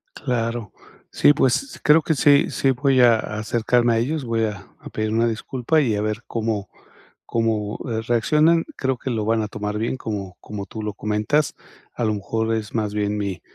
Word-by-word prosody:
Claro. 115 -4 -2 0.4
Sí, 145 - +5
pues, 155 - 0
creo 150 +2 +6
que 160 - 0
sí 145 +1 +4
sí 135 - +1
voy 130 0 +2
a 120 -2 +6
acercarme 115 +3 +1
a - - +2
ellos, 145 +4 -1
voy 115 -1 0
a 105 -2 -6
a - - -10
pedir 110 0 -2
una 115 +1 +3
disculpa 125 +6 0
y 115 -6 +1
a 105 - -1
ver, 110 +2 -2
cómo 110 -4 -2 0.6
cómo, 110 -2 -1
eh, 110 -1 -1
reaccionan. 150 +8 +3
Creo 130 -1 -1
que 130 - -5
lo 110 -2 -1
van 110 0 +2
a 105 - -2
tomar 105 0 -4
bien, 115 +4 -2
como 100 -6 -5
como 100 -2 -7
tú 110 +2 -7
lo 105 -1 -3
comentas. 105 +9 0 0.4
A - - -3
lo 110 - +1
mejor 110 +2 -1
es 110 -1 -3
más 105 -2 -1
bien 105 0 -1
mi 100 -3 -3
115 Hz, 195 wpm, -22 LUFS, 105-130 Hz, 0.6 s, creo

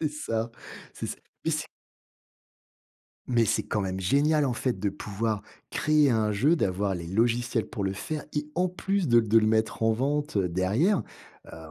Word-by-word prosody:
C'est 155 - +1
ça, 115 -6 -3 0.4
c'est - - -5
ça. - - -5 0.3
Mais 160 - +1
c'est 155 0 -2 1.6
mais 120 -3 +2
c'est - - +1
quand 105 - -1
même 95 0 -3
génial 145 - +3
en 125 - 0
fait 120 -5 -2
de 100 0 0
pouvoir 105 +2 -3 0.3
créer 150 -2 +3
un 110 -2 +2
jeu, 140 +12 +3
d'avoir 100 - 0
les 85 -1 -6
logiciels 115 +3 +1
pour 105 - -4
le 95 0 0
faire 150 +9 -4
et 150 0 -2
en 180 +1 +2
plus 190 -1 -1
de 120 -1 +6
de 110 0 +3
le 110 - +4
mettre 110 0 +1
en 110 - +4
vente 145 +2 -1
derrière, 100 - +2 0.5
heu - - -9
115 Hz, 180 wpm, -27 LUFS, 105-150 Hz, 1.6 s, de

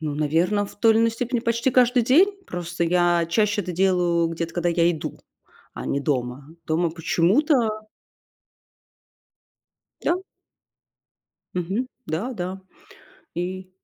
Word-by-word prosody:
Ну, 150 -2 -3
наверное, 165 +8 +1
в 200 - -11
той 225 +1 +5
или 220 - +3
иной 230 0 +3
степени 240 +1 -2
почти 235 +2 0
каждый 250 0 +4
день. 310 - +5 0.2
Просто 170 -1 -3
я 175 0 +3
чаще 210 +3 +1
это 180 -1 -5
делаю 175 -2 +2
где-то, 165 0 -4
когда 175 0 0
я 170 0 +3
иду, 160 -3 -5 0.6
а - - -6
не 140 - -1
дома. 135 -1 -2 0.2
Дома 165 +1 +1
почему-то 175 - +2 2.5
Да. 345 - +2 1.4
Мгм, 190 +8 -1 0.2
да-да, 185 +1 -4 0.8
и 185 +1 -4
180 Hz, 120 wpm, -23 LUFS, 165-225 Hz, 2.5 s, той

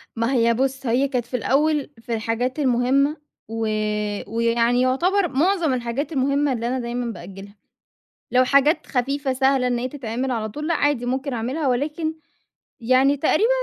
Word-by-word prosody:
ما 230 +3 0
هي 235 -2 +3
بُص، 265 +2 -1
هي 250 +4 +2
كانت 250 -4 -2
في 250 - -3
الأول 295 +4 +1
في 230 +1 -5
الحاجات 230 +4 -2
المهمة 270 +3 +2 0.3
و 225 0 -3 0.6
ويعني 230 +2 +1
يعتبر 350 +10 +2
معظم 330 +1 +1
الحاجات 245 +5 -3
المهمة 280 0 +1
اللي 235 -1 -2
أنا 255 +2 -1
دايمًا 240 0 -3
بأجّلها. 195 +2 -11 0.8
لو 255 +1 +4
حاجات 285 +4 +3
خفيفة 275 +2 -1
سهلة 265 0 +2
إن 245 -1 0
هي 250 +2 -2
تتعمل 255 -1 -4
على 225 -3 -2
طول، 300 +8 -6
لأ 335 - +2
عادي 290 -5 +1
ممكن 265 +3 -2
أعملها 255 +6 -2
ولكن 300 +5 -1 0.7
يعني 260 +4 +3
تقريبًا 320 - +2
255 Hz, 160 wpm, -22 LUFS, 235-285 Hz, 0.8 s, لو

